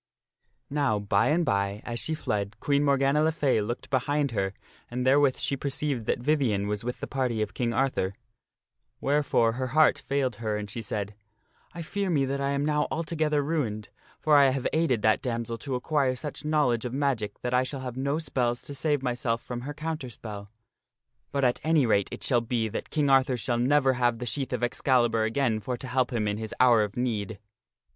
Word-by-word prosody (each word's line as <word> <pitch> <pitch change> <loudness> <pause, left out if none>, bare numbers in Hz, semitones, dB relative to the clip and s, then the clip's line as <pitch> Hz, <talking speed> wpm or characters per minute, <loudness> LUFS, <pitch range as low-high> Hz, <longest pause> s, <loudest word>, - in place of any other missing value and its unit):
( - - -60 0.3
Now, 140 -7 +1
by 100 -1 +2
and 165 +3 +2
by, 100 -3 -1
as 120 0 -3
she 160 - -1
fled, 105 -5 -3
Queen 140 +3 +1
Morgana 140 +1 +3
le 160 +1 +3
Fay 140 -8 +1
looked 120 +7 -5
behind 140 +2 +1
her 95 -3 -1 0.3
and 125 +1 -3
therewith 135 0 +4
she 140 - -1
perceived 140 -3 -2
that - - +1
Vivien 120 -7 +1
was 105 +1 -3
with 125 +1 -4
the - - -2
party 130 -4 -1
of 100 -2 -6
King 120 +1 -1
Arthur, 115 -6 0 0.8
wherefore 140 -5 +2
her 130 +2 -3
heart 155 - +5
failed 135 -5 -1
her 110 -2 -2
and 105 -1 -6
she 115 - -5
said, 105 -1 -4 0.3
" - - -35
I 170 - -5
fear 200 +4 -2
me 145 -6 +2
that 140 +1 -2
I 140 - 0
am 140 +1 0
now 150 0 +1
altogether 155 -2 0
ruined, 125 -9 -2 0.3
for 155 -1 +3
I 140 -1 +6
have 130 -1 -2
aided 155 -9 +1
that 110 0 +3
damsel 115 -2 -3
to 135 -3 -3
acquire 135 0 +1
such 150 +3 -6
knowledge 150 -7 +1
of 125 0 -4
magic 130 -8 -1
that 125 - -2
I 125 - +4
shall 130 +1 -4
have 125 -2 -5
no 140 +3 -1
spells 125 -6 -1
to 145 - -8
save 145 0 0
myself 120 -2 -1
from 120 -1 -5
her 145 +4 -5
counter 155 -4 -4
spell. 105 -3 -8 0.8
But 140 - -1
at 125 - +1
any 155 -3 +3
rate 100 -4 +2
it - - -7
shall 120 -3 +3
be 115 -1 -1
that 110 - -5
King 145 -3 +1
Arthur 130 -1 +4
shall 120 +2 -1
never 135 +1 +3
have 120 -2 +1
the 125 - -5
sheath 135 +3 -2
of 125 -1 -2
Excalibur 120 -2 +2
again 115 -1 +1
for 125 +3 -4
to 130 - -7
help 130 +1 +1
him 110 -4 0
in 105 0 -1
his 110 -1 -5
hour 120 -3 +6
of 105 0 -3
need." 110 -4 -2
125 Hz, 210 wpm, -27 LUFS, 115-140 Hz, 0.8 s, I